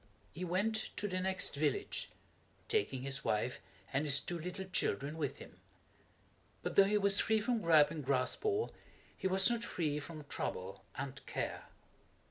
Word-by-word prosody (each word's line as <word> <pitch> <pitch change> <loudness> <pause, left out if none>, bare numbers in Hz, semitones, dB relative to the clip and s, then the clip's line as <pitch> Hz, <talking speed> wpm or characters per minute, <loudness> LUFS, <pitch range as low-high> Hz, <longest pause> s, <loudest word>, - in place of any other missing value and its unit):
He 175 - -6
went 205 +5 0
to 205 - -1
the 185 -2 -1
next 185 -4 +1
village, 270 - -1 0.6
taking 270 - 0
his 135 +1 -3
wife 115 +4 0 0.3
and 135 +2 +2
his 145 -1 +5
two 175 -1 -4
little 180 +3 -5
children 155 -5 -1
with 150 -4 -2
him. - - -13 1.0
But - - -3
though 195 - +8
he 210 +1 +2
was 200 0 +4
free 220 0 +3
from 235 +1 0
Gripe 155 -4 +6
and 155 -2 -5
Graspall 140 - 0 0.4
he 190 - -1
was 190 +1 +6
not 235 0 0
free 150 -8 -1
from 155 +1 -8
trouble 95 -8 -4
and 135 0 -5
care. - - -3
175 Hz, 160 wpm, -35 LUFS, 145-200 Hz, 1.0 s, though